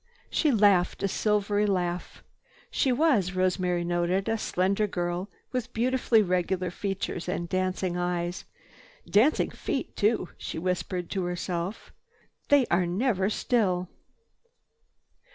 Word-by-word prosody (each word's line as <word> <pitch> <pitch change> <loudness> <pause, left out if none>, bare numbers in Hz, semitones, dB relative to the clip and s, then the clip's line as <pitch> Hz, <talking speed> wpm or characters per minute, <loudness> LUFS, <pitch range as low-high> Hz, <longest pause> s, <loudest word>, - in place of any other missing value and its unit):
She 305 - +2
laughed 200 -7 +3
a - - +3
silvery 210 +1 +1
laugh. 180 -2 -2 0.5
She 265 - +2
was, 245 - +2
Rosemary 185 -1 +1
noted, 175 +3 0
a 225 - +1
slender 200 0 0
girl 175 +1 -3 0.2
with 250 -1 -3
beautifully 240 -2 +3
regular 180 -1 0
features 190 -2 -3
and 170 -1 -2
dancing 185 0 -1
eyes. 175 0 -2 0.6
"Dancing 240 +10 +3
feet - - -4
too," 210 -3 +1
she - - -5
whispered 180 0 -2
to 190 -3 -1
herself. 175 +2 -4 0.6
"They 285 -3 +5
are 175 0 +3
never 195 +1 +1
still." 190 -7 0
185 Hz, 115 wpm, -27 LUFS, 180-210 Hz, 0.6 s, They